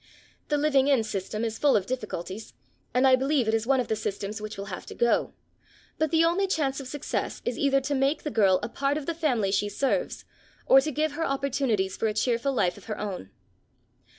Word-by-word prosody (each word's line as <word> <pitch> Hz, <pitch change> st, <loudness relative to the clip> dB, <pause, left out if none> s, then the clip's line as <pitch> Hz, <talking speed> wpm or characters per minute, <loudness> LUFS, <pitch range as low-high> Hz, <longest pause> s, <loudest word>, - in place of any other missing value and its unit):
The 295 Hz, -, +1 dB
living 285 Hz, -2 st, +3 dB
in 270 Hz, -5 st, +4 dB
system 215 Hz, +1 st, -3 dB
is 225 Hz, -1 st, -4 dB
full 290 Hz, -2 st, +4 dB
of 195 Hz, -, -2 dB
difficulties, 215 Hz, -4 st, -5 dB, 0.4 s
and 255 Hz, +2 st, +3 dB
I 260 Hz, -1 st, +7 dB
believe 265 Hz, -1 st, +1 dB
it 220 Hz, -, +1 dB
is 225 Hz, +1 st, 0 dB
one 270 Hz, -1 st, +3 dB
of 250 Hz, -, -1 dB
the 220 Hz, -, 0 dB
systems 210 Hz, 0 st, -4 dB
which 215 Hz, -1 st, -6 dB
will 200 Hz, -, -5 dB
have 180 Hz, -, -7 dB
to -, -, -8 dB
go; 235 Hz, 0 st, +1 dB, 0.6 s
but 315 Hz, -, +2 dB
the 325 Hz, +2 st, +4 dB
only 365 Hz, +4 st, +2 dB
chance 285 Hz, -7 st, 0 dB
of 270 Hz, -, -7 dB
success 290 Hz, +2 st, -3 dB
is 245 Hz, -, -2 dB
either 275 Hz, -1 st, +3 dB
to 285 Hz, +2 st, -2 dB
make 275 Hz, +3 st, +1 dB
the 300 Hz, -, -3 dB
girl 195 Hz, -6 st, +4 dB
a -, -, -1 dB
part 275 Hz, +4 st, -1 dB
of 300 Hz, -, -5 dB
the 335 Hz, -, -1 dB
family 255 Hz, -12 st, 0 dB
she 205 Hz, +1 st, +1 dB
serves, 275 Hz, -, -1 dB, 0.4 s
or 270 Hz, -, +7 dB
to 305 Hz, +3 st, -2 dB
give 310 Hz, +2 st, 0 dB
her 325 Hz, +3 st, -3 dB
opportunities 270 Hz, -8 st, 0 dB
for 225 Hz, -, 0 dB
a 215 Hz, -, -2 dB
cheerful 235 Hz, +4 st, +1 dB
life 180 Hz, -9 st, +1 dB
of -, -, -17 dB
her 215 Hz, -, -4 dB
own. 190 Hz, -, -5 dB
255 Hz, 225 wpm, -27 LUFS, 215-285 Hz, 0.6 s, I